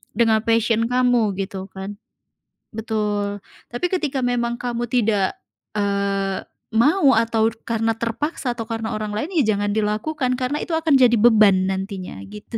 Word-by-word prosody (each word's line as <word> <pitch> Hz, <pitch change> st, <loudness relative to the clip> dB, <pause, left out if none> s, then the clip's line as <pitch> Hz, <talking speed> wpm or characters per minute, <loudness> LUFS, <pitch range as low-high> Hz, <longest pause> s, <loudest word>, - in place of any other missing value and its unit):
dengan 220 Hz, -1 st, +3 dB
passion 230 Hz, 0 st, +2 dB
kamu 245 Hz, -5 st, +2 dB
gitu 195 Hz, -1 st, -5 dB
kan. 195 Hz, +1 st, -7 dB, 0.8 s
Betul, 210 Hz, -2 st, -2 dB, 0.3 s
tapi 240 Hz, +9 st, -1 dB
ketika 300 Hz, -8 st, -1 dB
memang 240 Hz, -1 st, 0 dB
kamu 240 Hz, -1 st, -2 dB
tidak, 210 Hz, -6 st, +1 dB, 0.4 s
eee, 200 Hz, -1 st, 0 dB, 0.4 s
mau 280 Hz, -, +4 dB
atau 225 Hz, -1 st, +2 dB
karena 225 Hz, 0 st, 0 dB
terpaksa 245 Hz, +4 st, -2 dB
atau 225 Hz, -2 st, -5 dB
karena 225 Hz, 0 st, -3 dB
orang 215 Hz, -1 st, -4 dB
lain, 290 Hz, -, -3 dB
ya 240 Hz, -, +2 dB
jangan 205 Hz, 0 st, -1 dB
dilakukan, 240 Hz, +6 st, -1 dB
karena 260 Hz, +4 st, -1 dB
itu 325 Hz, -, -2 dB
akan 315 Hz, -4 st, +3 dB
jadi 240 Hz, -2 st, +5 dB
beban 210 Hz, -4 st, +5 dB
nantinya, 190 Hz, -, -5 dB
gitu 210 Hz, +2 st, -8 dB
225 Hz, 145 wpm, -21 LUFS, 205-245 Hz, 0.8 s, jadi